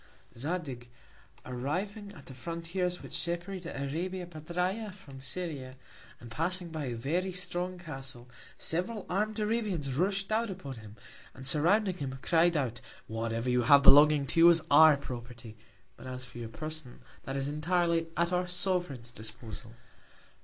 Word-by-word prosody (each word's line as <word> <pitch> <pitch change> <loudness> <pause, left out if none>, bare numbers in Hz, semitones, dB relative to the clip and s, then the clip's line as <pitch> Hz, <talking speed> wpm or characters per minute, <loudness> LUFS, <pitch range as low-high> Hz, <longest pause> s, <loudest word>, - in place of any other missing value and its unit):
Zadig, 135 -3 -4 0.6
arriving 185 - -3
at 140 - -13
the 130 - -9
Frontiers 170 +6 -3
which - - -7
separate 175 +2 -2
Arabia 170 +7 -3
Petræa 180 +6 -2
from 145 -9 -12
Syria, 130 -2 -4 0.4
and 120 -1 -11
passing 175 +6 0
by 160 -3 -4
a 120 -2 -3
very 170 +11 -1
strong 180 0 -2
Castle, 135 -7 -7 0.3
several 185 +6 -2
arm'd 210 +3 0
Arabians 210 - -1
rush'd 195 +7 0
out 225 +1 +1
upon 160 -10 -6
him, 105 -1 -11 0.4
and 130 - -9
surrounding 180 +8 +3
him, 135 -4 -4
cried 170 0 +4
out: 125 -5 -2 0.2
Whatever 115 +1 -2
you 125 0 +3
have 140 +4 +7
belonging 145 0 +8
to 165 - 0
you 170 +1 +10
is 170 -2 +4
our 155 0 +8
Property, 120 -4 -8 0.4
but - - -10
as 130 0 -5
for 125 -1 -10
your 115 -1 -5
Person, 155 +1 -6 0.2
that 135 - -4
is 135 0 -1
entirely 165 +2 +1
at 170 +1 +2
our 180 0 +1
Sovereign's 175 -10 -1
Disposal. 110 0 -8
160 Hz, 150 wpm, -31 LUFS, 130-180 Hz, 0.6 s, you